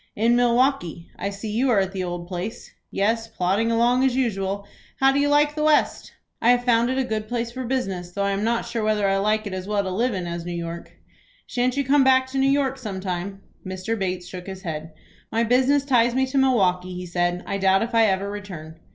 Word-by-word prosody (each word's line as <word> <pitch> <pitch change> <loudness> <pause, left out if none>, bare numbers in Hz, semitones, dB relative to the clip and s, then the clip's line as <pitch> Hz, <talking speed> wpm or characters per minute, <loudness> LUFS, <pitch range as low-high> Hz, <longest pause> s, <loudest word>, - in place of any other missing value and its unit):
"In 230 +3 +3
Milwaukie. 240 - +1
I 200 - -2
see 200 +2 -6
you 250 +5 +1
are 225 -5 +4
at 190 0 -2
the 190 -1 -3
old 175 -1 -5
place." 180 +4 -6 0.2
"Yes, 225 +3 0
plodding 220 +2 0
along 240 +3 +3
as 265 -2 +2
usual. 200 -5 -1 0.3
How 270 0 +5
do 275 - +1
you 290 0 +2
like 295 0 +3
the 305 - -3
West?" 305 -1 +2 0.3
"I 230 - +4
have 245 0 +3
found 235 -1 +3
it 260 - -1
a 265 - +2
good 220 -3 -3
place 235 0 -3
for 260 +2 -5
business, 195 -9 -2
though 200 +3 -3
I 200 - +1
am 200 +1 -1
not 230 +1 0
sure 230 -2 -3
whether 215 -2 +1
I 195 0 +2
like 215 +2 +1
it 200 - -5
as 185 0 -5
well 205 -1 0
to 190 - -3
live 230 +4 0
in 185 -2 -3
as 170 0 -4
New 175 0 -5
York." 170 0 -6 0.5
"Shan't 250 +1 -1
you 280 - +2
come 275 +1 +4
back 260 0 +4
to 270 - -1
New 270 0 +3
York 270 -1 +1
some 205 -6 -5
time?" 190 +1 -4 0.2
Mr. 185 +4 -3
Bates 185 -3 -3
shook 180 0 -8
his 190 -1 -8
head. 160 -1 -5 0.4
"My 230 +1 +1
business 260 +4 +3
ties 240 -3 +3
me 265 0 +2
to 265 +1 -3
Milwaukie," 185 -9 +2
he 180 0 -6
said. 175 0 -1
"I 200 - -3
doubt 190 +1 +3
if 235 +1 -5
I 225 -1 +5
ever 195 0 0
return." 180 -6 -8
215 Hz, 240 wpm, -23 LUFS, 185-250 Hz, 0.5 s, How